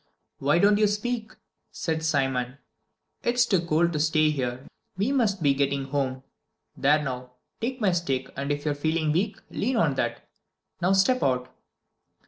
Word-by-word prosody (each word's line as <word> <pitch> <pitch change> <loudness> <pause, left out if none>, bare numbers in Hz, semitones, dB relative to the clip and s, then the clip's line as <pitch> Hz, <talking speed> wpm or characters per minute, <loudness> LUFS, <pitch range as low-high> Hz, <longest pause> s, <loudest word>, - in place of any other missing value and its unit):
"Why 145 +4 +3
don't 205 +3 +4
you 215 - +5
speak?" 215 +1 -2 0.4
said 160 -1 -2
Simon. 135 -4 0 0.6
"It's 245 0 +2
too 190 -7 +2
cold 170 +1 +2
to 150 - -1
stay 155 0 +3
here, 130 -2 -3 0.3
we 205 +8 +1
must 210 -10 +1
be 140 -1 +4
getting 140 0 0
home. 135 -2 -2 0.5
There 150 +2 +3
now, 125 -2 -5 0.3
take 250 +3 -3
my 205 -5 +3
stick, 140 -7 -2
and 140 +2 -3
if 145 +1 -3
you're 150 - +1
feeling 155 +1 0
weak, 195 +7 0
lean 250 +5 -1
on 160 -9 +3
that. - - -2 0.5
Now 180 +3 +3
step 195 +7 +3
out!" 125 -1 0
155 Hz, 160 wpm, -26 LUFS, 135-200 Hz, 0.6 s, you